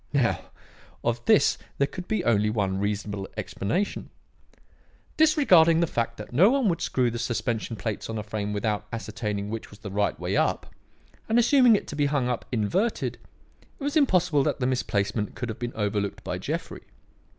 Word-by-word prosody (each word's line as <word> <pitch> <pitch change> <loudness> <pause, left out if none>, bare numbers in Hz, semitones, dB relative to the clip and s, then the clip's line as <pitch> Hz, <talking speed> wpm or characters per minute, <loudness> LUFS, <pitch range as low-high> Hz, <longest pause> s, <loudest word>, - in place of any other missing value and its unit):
"Now, 130 -5 +1 0.6
of 120 0 -1
this - - +4 0.2
there 140 - +3
could 180 +5 -8
be 215 -5 0
only 105 -2 +3
one 100 -3 -1
reasonable 100 -1 -2
explanation. 180 - -2 1.1
Disregarding 190 - +5
the 170 - +3
fact 115 -6 -2
that 105 +3 -9
no 175 - +6
one 270 -2 +2
would 170 -1 -1
screw 125 -2 +1
the 120 - -4
suspension 115 0 -2
plates 110 +1 -4
on 110 - -3
a 105 - -3
frame 105 -1 -3
without 105 0 -2
ascertaining 105 -2 -4
which 115 0 -5
was 105 - -14
the 100 -1 -8
right 100 +1 0
way - - -2
up, - - 0 0.6
and 225 - +3
assuming 240 -1 +6
it - - -2
to - - -5
be 145 -1 +2
hung 140 -3 0
up 125 - -2
inverted, 170 - 0 0.6
it - - -8
was 285 +2 -1
impossible 180 - +3
that 135 - 0
the 125 - 0
misplacement 105 -4 -1
could 125 - -4
have 110 - -6
been 120 0 -4
overlooked 105 -2 -2
by - - -3
Jeffrey. - - -4
120 Hz, 180 wpm, -26 LUFS, 105-170 Hz, 1.1 s, no